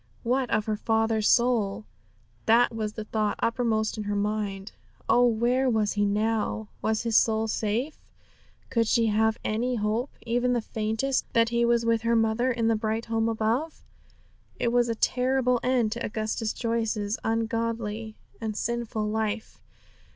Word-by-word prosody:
What 250 Hz, +1 st, 0 dB
of 215 Hz, -1 st, +1 dB
her 215 Hz, -1 st, -1 dB
father's 220 Hz, 0 st, +1 dB
soul? 225 Hz, -4 st, +2 dB, 0.6 s
That 235 Hz, +2 st, +5 dB
was 215 Hz, -1 st, -3 dB
the 220 Hz, -, -5 dB
thought 215 Hz, -1 st, -1 dB
uppermost 225 Hz, -2 st, 0 dB
in 210 Hz, -, -4 dB
her 205 Hz, 0 st, -1 dB
mind. 205 Hz, -1 st, -2 dB, 0.4 s
Oh, 245 Hz, 0 st, +5 dB
where 245 Hz, +3 st, +2 dB
was 215 Hz, -3 st, +1 dB
he 205 Hz, 0 st, +1 dB
now? 215 Hz, +1 st, -1 dB
Was 220 Hz, 0 st, 0 dB
his 230 Hz, -2 st, -1 dB
soul 220 Hz, 0 st, +3 dB
safe? 220 Hz, +7 st, -2 dB, 0.7 s
Could 230 Hz, -2 st, +2 dB
she 230 Hz, +1 st, +3 dB
have 220 Hz, +1 st, +2 dB
any 240 Hz, +4 st, -1 dB
hope, 220 Hz, +4 st, -1 dB, 0.2 s
even 245 Hz, +1 st, +1 dB
the 240 Hz, -, +2 dB
faintest, 220 Hz, +5 st, -2 dB
that 230 Hz, 0 st, +4 dB
he 235 Hz, 0 st, +2 dB
was 235 Hz, -1 st, +2 dB
with 230 Hz, -1 st, +2 dB
her 235 Hz, 0 st, +1 dB
mother 225 Hz, +2 st, +2 dB
in 230 Hz, -2 st, 0 dB
the 225 Hz, -, +3 dB
bright 220 Hz, +1 st, -2 dB
home 225 Hz, 0 st, 0 dB
above? 230 Hz, +8 st, -1 dB, 0.8 s
It 235 Hz, -, +1 dB
was 240 Hz, 0 st, +2 dB
a 230 Hz, -, 0 dB
terrible 250 Hz, +1 st, +1 dB
end 250 Hz, -4 st, +1 dB
to 235 Hz, +1 st, -3 dB
Augustus 215 Hz, 0 st, -2 dB
Joyce's 225 Hz, -3 st, -2 dB
ungodly 225 Hz, -1 st, -2 dB, 0.3 s
and 215 Hz, -2 st, -3 dB
sinful 235 Hz, -2 st, -2 dB
life. 220 Hz, 0 st, -3 dB
225 Hz, 160 wpm, -27 LUFS, 215-235 Hz, 0.8 s, That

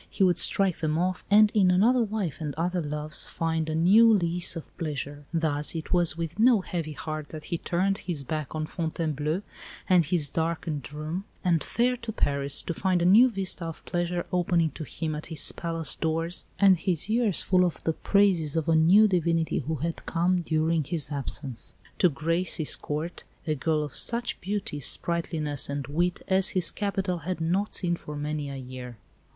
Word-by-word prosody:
He -, -, 0 dB
would 175 Hz, -2 st, +3 dB
strike 195 Hz, -1 st, +4 dB
them 155 Hz, 0 st, -1 dB
off, 180 Hz, +1 st, -1 dB
and 210 Hz, +1 st, +6 dB
in 195 Hz, -4 st, +4 dB
another 225 Hz, +8 st, +4 dB
wife 205 Hz, -8 st, -2 dB
and 150 Hz, -3 st, -4 dB
other 175 Hz, +3 st, -1 dB
loves 150 Hz, 0 st, -2 dB
find 160 Hz, -1 st, -2 dB
a 155 Hz, -, -1 dB
new 205 Hz, +8 st, +6 dB
lease 175 Hz, -4 st, +1 dB
of 165 Hz, -, -9 dB
pleasure. 145 Hz, -2 st, -5 dB
Thus 155 Hz, -2 st, +1 dB
it 160 Hz, +2 st, -4 dB
was 170 Hz, -3 st, +3 dB
with 165 Hz, +3 st, -5 dB
no 230 Hz, -2 st, +5 dB
heavy 165 Hz, -4 st, -4 dB
heart 155 Hz, +1 st, -5 dB
that 155 Hz, -1 st, -8 dB
he 170 Hz, -, -3 dB
turned 190 Hz, +3 st, 0 dB
his 165 Hz, -6 st, -3 dB
back 155 Hz, +1 st, -4 dB
on 155 Hz, 0 st, -2 dB
Fontainebleau 160 Hz, +1 st, -2 dB, 0.4 s
and 180 Hz, -2 st, +5 dB
his 160 Hz, -1 st, 0 dB
darkened 160 Hz, -4 st, -3 dB
room, 155 Hz, +6 st, -5 dB, 0.2 s
and 170 Hz, -5 st, +2 dB
fared 245 Hz, +1 st, 0 dB
to 235 Hz, -1 st, -4 dB
Paris 140 Hz, -8 st, 0 dB
to 170 Hz, -, -3 dB
find 180 Hz, 0 st, +1 dB
a -, -, +1 dB
new 220 Hz, +8 st, +7 dB
vista 195 Hz, -5 st, -3 dB
of 165 Hz, -1 st, -7 dB
pleasure 175 Hz, 0 st, -2 dB
opening 170 Hz, -3 st, +2 dB
to 155 Hz, -, -7 dB
him 155 Hz, +2 st, -4 dB
at 150 Hz, +1 st, -5 dB
his 160 Hz, -3 st, -1 dB
palace 165 Hz, -3 st, -3 dB
doors, 165 Hz, +2 st, -2 dB
and 195 Hz, -2 st, +6 dB
his 175 Hz, -1 st, -1 dB
ears 220 Hz, -3 st, +2 dB
full 185 Hz, -1 st, +3 dB
of 175 Hz, -2 st, -2 dB
the 160 Hz, -, 0 dB
praises 180 Hz, -6 st, +2 dB
of 160 Hz, -2 st, -1 dB
a 165 Hz, -, +3 dB
new 180 Hz, +7 st, +6 dB
divinity 170 Hz, -3 st, +1 dB
who 160 Hz, +3 st, -3 dB
had 165 Hz, +4 st, -4 dB
come, 175 Hz, +2 st, +1 dB
during 160 Hz, 0 st, +1 dB
his 155 Hz, -1 st, -3 dB
absence, 135 Hz, -3 st, -5 dB, 0.2 s
to 180 Hz, -, +5 dB
grace 165 Hz, +4 st, -1 dB
his 155 Hz, -, +1 dB
Court 155 Hz, +4 st, -5 dB, 0.2 s
a 155 Hz, -, 0 dB
girl 155 Hz, +1 st, 0 dB
of 145 Hz, -5 st, -7 dB
such 235 Hz, 0 st, 0 dB
beauty, 195 Hz, -6 st, -3 dB
sprightliness, 155 Hz, -1 st, -2 dB
and 140 Hz, -1 st, -3 dB
wit 175 Hz, +5 st, -1 dB
as 190 Hz, 0 st, +4 dB
his 180 Hz, -, +1 dB
capital 195 Hz, -3 st, -2 dB
had 175 Hz, +3 st, -4 dB
not 180 Hz, +6 st, 0 dB
seen 175 Hz, -2 st, +1 dB
for 150 Hz, -3 st, -9 dB
many 150 Hz, 0 st, -3 dB
a 140 Hz, -, -6 dB
year. 125 Hz, -2 st, -8 dB
165 Hz, 190 wpm, -27 LUFS, 155-185 Hz, 0.4 s, new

